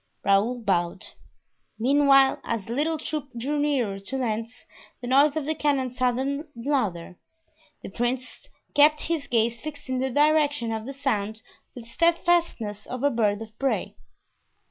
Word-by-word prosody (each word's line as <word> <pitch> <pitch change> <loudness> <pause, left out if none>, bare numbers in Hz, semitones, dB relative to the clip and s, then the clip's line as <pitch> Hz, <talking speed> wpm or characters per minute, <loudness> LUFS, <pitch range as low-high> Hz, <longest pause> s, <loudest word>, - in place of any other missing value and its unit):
Raoul 210 +5 +2
bowed. 175 -3 -1 0.7
Meanwhile, 275 +2 +4
as 230 -4 -3
the 230 - -5
little 310 +5 0
troop 300 -2 -4
drew 285 +5 -1
nearer 255 -9 0
to 230 +7 -5
Lens, 230 -1 -3 0.3
the - - -8
noise 280 +4 +4
of 310 -3 -2
the 310 - 0
cannon 280 -4 0
sounded 260 +4 -1
louder. 220 -10 -2 0.6
The - - -6
prince 245 +4 -4 0.2
kept 300 +1 +5
his 325 -3 -2
gaze 230 0 +1
fixed 290 -2 -8
in 260 0 -1
the 265 +1 0
direction 290 -3 +2
of 220 +1 -4
the 275 - -5
sound 220 -5 -2 0.3
with 245 - -8
the 230 - -17
steadfastness 335 - +1
of 255 +1 -5
a 285 - +3
bird 215 -3 0
of 220 0 -15
prey. 275 -1 -1
255 Hz, 155 wpm, -25 LUFS, 225-290 Hz, 0.7 s, kept